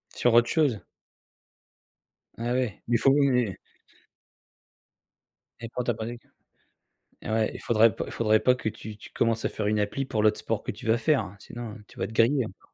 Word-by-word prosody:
Sur 120 - +2
autre 120 0 +5
chose? 140 -10 +2 1.6
Ah 120 +2 -2
ouais. 125 -5 -1
Il 120 - +3
faut 135 - +4
mais 125 -8 +2 2.0
Et 115 - -5
pour 125 +1 -3
toi, 120 -1 0
pareil 115 +2 -5
q - - -26 1.0
eh - - -4
ouais, 110 0 +1
il - - -8
faudrait 115 -2 +4
pas - - -3
il - - -9
faudrait 110 -1 +3
pas 125 - +5
que 125 -3 -4
tu 110 0 -6
tu - - -13
commences 115 -1 0
à - - +1
faire 105 -1 -3
une 105 0 +1
appli 105 +7 -1
pour 110 -5 -1
l'autre 105 0 +3
sport 110 -2 -2
que - - -4
tu 105 - -12
vas 110 +1 +3
faire, 115 -8 +1
sinon 120 0 -8
tu 130 - -18
vas - - -2
être - - -8
grillé 120 +3 +3
encore. 95 - -11
115 Hz, 200 wpm, -27 LUFS, 110-125 Hz, 2.0 s, autre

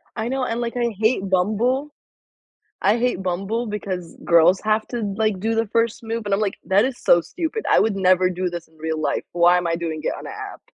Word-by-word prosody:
I 225 +1 -2
know, 265 -1 -1
and, 230 +1 -2
like, 235 +1 -3
I 235 -3 -1
hate 215 -3 +1
Bumble. 225 +10 +1 0.9
I 205 +4 +4
hate 240 -6 0
Bumble 195 +6 -2
because 185 -5 -5
girls 170 +2 +5
have 215 0 +1
to, 240 -2 -3 0.2
like, 215 -4 0
do 225 +2 0
the 225 0 +1
first 230 +2 0
move, 225 0 -3
and, 205 - -3
I'm 205 - 0
like, 200 -2 0
"That 200 +4 +3
is 260 -2 -3
so 170 - +4
stupid. 345 - -4
I - - +5
would 210 -3 +1
never 185 -1 +3
do 180 0 -2
this 170 -2 -7
in 160 - -26
real 160 0 -3
life. - - -1
Why 175 +1 +5
am 175 -1 0
I 165 - +1
doing 160 -2 -4
it - - 0
on - - -9
a - - -6
app?" - - -8
205 Hz, 235 wpm, -22 LUFS, 180-230 Hz, 0.9 s, girls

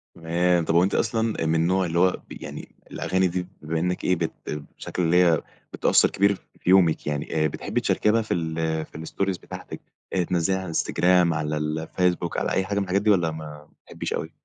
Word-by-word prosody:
تمام، 85 +1 +1
طب 80 - 0
هو 85 - +6
أنتِ 95 - 0
أصلًا 115 -1 0
آآ - - 0
من 80 +1 +2
النوع 90 +3 +2
اللي 85 0 0
هو 90 +1 +5 0.2
ب - - -10
يعني - - -8 0.2
الأغاني 95 0 +1
دي 90 0 -3
بما 80 +2 -2
إنك 90 +2 -1
إيه، 90 - +3
بت 80 -1 -2 0.5
بشكل - - -4
اللي 90 +2 +4
هي 85 -3 +3 0.3
بتأثر - - +4
كبير 100 +1 +2 0.2
في - - -3
يومِك 90 -5 +4
يعني، 75 +1 -1
آآ - - +3
بتحبي 70 - -3
تشاركيها 110 +2 +2
في 110 - -2
ال 80 -2 -2 0.3
في - - -13
الstories 95 +1 -2
بتاعتك، - - -9 0.3
آآ، 95 - +2
تنزليها 90 +2 0
على 95 - -5
الإنستجرام، 90 0 +2
على 75 0 -2
الفيسبوك، 80 +3 -1
على - - -1
أي 95 - +1
حاجة 100 +1 -2
من 100 - +2
الحاجات 95 +1 0
دي؟ 110 - +1
والّا 85 -6 +3
ما 80 0 -7
ما 75 0 -11 0.2
بتحبيش - - -5
أوي؟ - - -4
90 Hz, 210 wpm, -25 LUFS, 80-95 Hz, 0.5 s, هو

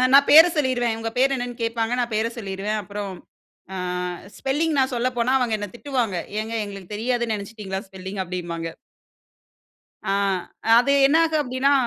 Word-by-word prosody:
நான் 280 0 +7
பேர 320 +3 +11
சொல்லிருவேன். 245 -5 +1
உங்க 225 0 -2
பேரு 270 +1 +4
என்னன்னு 245 0 -4
கேட்பாங்க. 230 0 -1
நான் 240 -1 -1
பேர 220 +1 +1
சொல்லிருவேன். 200 0 -3
அப்புறம், 200 0 -5 0.6
அ - - -4 0.6
ஸ்பெல்லிங் 300 +4 0
நான் 260 0 +1
சொல்லப்போனா, 245 0 0
அவங்க 240 -3 +1
என்ன 205 - -4
திட்டுவாங்க. 240 -7 -1 0.2
"ஏங்க, 220 +1 -5
எங்களுக்கு 200 -1 -9
தெரியாதுன்னு 235 0 0
நினைச்சிட்டீங்களா? 200 -2 -6
ஸ்பெல்லிங்.'' 190 +1 -6
அப்பிடிம்பாங்க. 170 -2 -4 1.4
ஆ - - +2 0.7
அது 245 +3 +3
என்னாகும்? 320 +1 +3
அப்பிடீன்னா. 260 +1 +1
230 Hz, 140 wpm, -23 LUFS, 200-260 Hz, 1.4 s, பேர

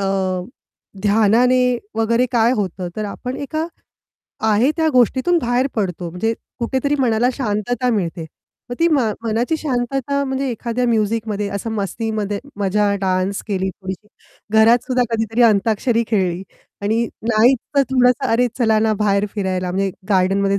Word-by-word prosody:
अ, 190 -2 -1 0.6
ध्यानाने 225 +4 +4 0.4
वगैरे 230 +3 +2
काय 235 +1 +3
होतं, 185 -3 -3
तर 215 - -2
आपण 250 +5 -5
एका 310 +3 -3 0.8
आहे 225 +7 +3
त्या 320 -1 +2
गोष्टीतून 260 +8 +3
बाहेर 245 0 +1
पडतो, 180 -5 -2
म्हणजे 225 +6 -1 0.3
कुठेतरी 265 +4 0
मनाला 240 -1 +2
शांतता 245 +2 -1
मिळते. 175 -6 -2 0.5
मग - - -2
ती 335 +1 +4
मा 265 -9 +2
मनाची 235 +7 0
शांतता 275 0 -1
म्हणजे 265 0 -2
एखाद्या 240 +1 -2
म्युझिकमध्ये 215 -2 0
असं 225 +3 -4
मस्तीमध्ये 210 0 -2 0.2
मजा 200 +1 +1
डान्स 190 +1 0
केली 190 -1 -1
थोडीशी, 190 +2 -8 0.5
घरात 230 +2 +5
सुद्धा 255 -1 +1
कधीतरी 225 +1 0
अंताक्षरी 225 +2 +2
खेळली 185 -4 0 0.4
आणि 225 +3 +1 0.3
नाहीच 240 +4 +4 0.2
तर 280 - +6
थोडंसं, 250 0 +3
"अरे 245 +2 +2
चला 220 -3 +3
ना, 220 0 +2
बाहेर 200 0 +2
फिरायला, 185 -3 -2
म्हणजे 195 +1 0 0.2
गार्डनमध्ये 195 +1 +2
225 Hz, 140 wpm, -19 LUFS, 200-250 Hz, 0.8 s, तर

